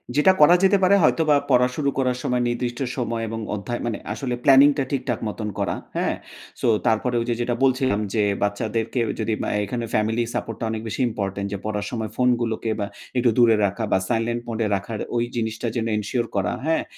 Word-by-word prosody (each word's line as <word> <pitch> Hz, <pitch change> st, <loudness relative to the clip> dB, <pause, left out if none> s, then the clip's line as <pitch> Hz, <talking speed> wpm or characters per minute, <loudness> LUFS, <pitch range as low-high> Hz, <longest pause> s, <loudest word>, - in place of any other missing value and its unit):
যেটা 170 Hz, +6 st, +6 dB
করা 170 Hz, +4 st, +8 dB
যেতে 200 Hz, +1 st, +5 dB
পারে 200 Hz, +2 st, +6 dB
হয়তোবা, 155 Hz, -2 st, +4 dB
পড়া 125 Hz, -1 st, +5 dB
শুরু 140 Hz, -2 st, 0 dB
করার 125 Hz, -2 st, +1 dB
সময় 125 Hz, 0 st, 0 dB
নির্দিষ্ট 120 Hz, +1 st, -3 dB, 0.2 s
সময় 115 Hz, -2 st, -2 dB
এবং 115 Hz, 0 st, -4 dB, 0.2 s
অধ্যায় 120 Hz, +4 st, -4 dB
মানে 115 Hz, -3 st, -2 dB, 0.2 s
আসলে 130 Hz, -3 st, -3 dB
প্ল্যানিং 140 Hz, 0 st, +7 dB
টা 140 Hz, -, +1 dB
ঠিকঠাক 125 Hz, -4 st, -1 dB
মতন 105 Hz, 0 st, -4 dB
করা, -, -, 0 dB, 0.2 s
হ্যাঁ? -, -, 0 dB, 0.5 s
সো -, -, +1 dB, 0.2 s
তারপরে 120 Hz, +2 st, +1 dB
ওই -, -, -2 dB
যে -, -, +2 dB
যেটা 120 Hz, 0 st, 0 dB
বলছিলাম 130 Hz, -5 st, +2 dB
যে, 105 Hz, -2 st, +2 dB, 0.2 s
বাচ্চাদেরকে 110 Hz, +4 st, -1 dB, 0.2 s
যদি 110 Hz, 0 st, 0 dB
অ্যা -, -, -2 dB, 0.2 s
এখানে 120 Hz, +3 st, -3 dB
ফ্যামিলি 110 Hz, +2 st, +1 dB
সাপোর্ট 115 Hz, -, -3 dB
টা 115 Hz, -, -2 dB
অনেক 110 Hz, -1 st, -3 dB
বেশি 115 Hz, -, -3 dB
ইম্পোর্টেন্ট। 100 Hz, -2 st, -3 dB
যে -, -, -2 dB
পড়ার 105 Hz, -1 st, -2 dB
সময় 110 Hz, -3 st, -3 dB
ফোনগুলোকে 120 Hz, -3 st, +1 dB
বা 100 Hz, -, 0 dB, 0.3 s
একটু 120 Hz, -1 st, +3 dB
দূরে 115 Hz, -2 st, +6 dB
রাখা 100 Hz, +3 st, -2 dB
বা -, -, +4 dB
সাইলেন্ট 120 Hz, 0 st, 0 dB
মোড 115 Hz, -1 st, -4 dB
এ -, -, +1 dB
রাখার, 105 Hz, +3 st, -5 dB, 0.2 s
ওই 120 Hz, -, +2 dB
জিনিসটা 110 Hz, 0 st, -2 dB
যেন 115 Hz, -2 st, -1 dB
এনশিওর 115 Hz, +3 st, -2 dB
করা, 95 Hz, -2 st, 0 dB
হ্যাঁ? 160 Hz, 0 st, +1 dB
120 Hz, 200 wpm, -23 LUFS, 110-125 Hz, 0.5 s, করা